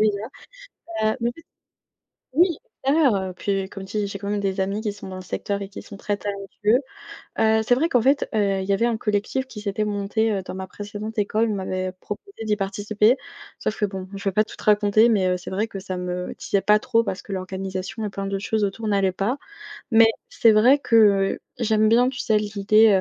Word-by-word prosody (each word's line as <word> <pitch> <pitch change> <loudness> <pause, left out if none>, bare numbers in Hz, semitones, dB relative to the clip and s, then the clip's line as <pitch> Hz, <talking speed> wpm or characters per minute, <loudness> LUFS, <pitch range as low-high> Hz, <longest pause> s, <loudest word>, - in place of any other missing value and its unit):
déjà, 210 -2 +2 0.8
bah, 215 0 +2
en - - -2
fait 330 - -14 0.9
oui 340 +1 +4 0.3
extérieur, 280 -5 +4
heu 190 -1 -2
et - - -11
puis 195 +1 -2
comme 195 -1 -8
tu 205 +3 -5
dis, 205 - 0
j'ai 200 0 -6
quand 200 +1 -5
même 205 0 0
des 195 -1 -1
amis 195 +3 -1
qui 215 -2 -1
sont 205 - -10
dans 190 - -7
le 185 - -6
secteur 200 +2 -3
et 195 - -5
qui 195 - -8
sont 200 - -11
très 205 0 -2
talentueux. 205 +3 0 0.6
Heu, 220 0 +4
c'est 245 +3 +3
vrai 320 +6 +1
qu'en 245 - +3
fait, 275 +4 +3
heu, 200 -3 +1
il - - -4
y 200 - +2
avait 230 +4 +2
un 230 -2 0
collectif 210 +6 -1
qui 215 -5 -9
s'était 210 +1 -1
monté, 210 +2 0
heu, 195 - -1
dans 185 - -7
ma 190 0 -5
précédente 205 +3 -7
école. 215 +2 +1
On - - 0
m'avait 185 -1 -2
proposé 310 - -8
d'y 210 - +2
participer, 210 +3 +2 0.4
sauf 215 - -2
que 210 - +3
bon, 190 -2 -6
je 195 - -7
vais - - -3
pas 215 - +4
tout 215 - -12
te - - -13
raconter, 210 +2 +4
mais, 195 -4 +3
heu, 180 0 +1
c'est 180 - -9
vrai 205 +4 0
que 200 - -7
ça 185 -1 -5
me 180 0 -4
disait 200 - 0
pas 210 0 +4
trop 230 0 +2
parce 195 -3 -4
que - - -11
l'organisation 190 +3 -4
et 210 - -2
plein 195 0 -5
d'autres 195 0 -3
choses 220 -1 0
autour 210 +3 -2
n'allaient 195 -2 +2
pas. 205 +9 -1 0.5
Mais, 225 -1 +7 0.2
c'est 225 - +4
vrai 240 +7 +6
que, 245 - -2
heu, 200 -3 +4 0.2
j'aime 220 -2 +3
bien 240 +3 +5
tu 260 - -8
sais 215 - +2
l'idée, 210 0 +4
205 Hz, 235 wpm, -23 LUFS, 195-220 Hz, 0.9 s, Mais